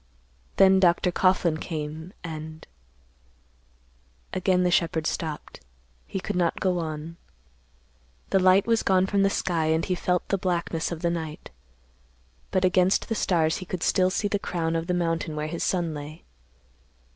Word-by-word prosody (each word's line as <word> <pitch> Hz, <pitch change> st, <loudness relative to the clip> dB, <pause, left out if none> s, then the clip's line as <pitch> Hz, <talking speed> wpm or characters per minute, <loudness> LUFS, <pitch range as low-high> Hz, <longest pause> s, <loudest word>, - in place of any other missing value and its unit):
Then 190 Hz, 0 st, +6 dB
Dr. 180 Hz, 0 st, +3 dB
Coughlan 180 Hz, -3 st, +2 dB
came, 155 Hz, +1 st, -5 dB
and—" 155 Hz, -1 st, -7 dB, 1.7 s
Again 185 Hz, -1 st, +2 dB
the 180 Hz, -, +2 dB
shepherd 165 Hz, -2 st, +1 dB
stopped. 160 Hz, -2 st, -4 dB, 0.5 s
He 195 Hz, -, -4 dB
could 205 Hz, +2 st, -4 dB
not 175 Hz, -2 st, +1 dB
go 180 Hz, -2 st, +1 dB
on. 160 Hz, 0 st, -5 dB, 1.1 s
The 195 Hz, -, +4 dB
light 185 Hz, +1 st, +5 dB
was 230 Hz, -1 st, +2 dB
gone 190 Hz, -1 st, +3 dB
from 200 Hz, +1 st, +1 dB
the 195 Hz, -, +4 dB
sky 170 Hz, -4 st, -1 dB
and 160 Hz, +1 st, +1 dB
he 185 Hz, -, -1 dB
felt 180 Hz, 0 st, -1 dB
the 195 Hz, -, +1 dB
blackness 170 Hz, -2 st, -1 dB
of 170 Hz, 0 st, -6 dB
the 170 Hz, -, +2 dB
night. 160 Hz, -2 st, -6 dB, 1.0 s
But 185 Hz, 0 st, +1 dB
against 185 Hz, +1 st, +2 dB
the -, -, +1 dB
stars 165 Hz, -6 st, +1 dB
he 185 Hz, -, -7 dB
could 185 Hz, -2 st, -4 dB
still 185 Hz, -1 st, +3 dB
see 205 Hz, +2 st, -1 dB
the 205 Hz, 0 st, -1 dB
crown 165 Hz, -4 st, -2 dB
of 165 Hz, 0 st, -2 dB
the 180 Hz, -, 0 dB
mountain 165 Hz, -2 st, -1 dB
where 150 Hz, 0 st, -2 dB
his 165 Hz, +2 st, -4 dB
son 175 Hz, -4 st, 0 dB
lay. 150 Hz, +1 st, -8 dB
175 Hz, 160 wpm, -26 LUFS, 160-185 Hz, 1.7 s, Then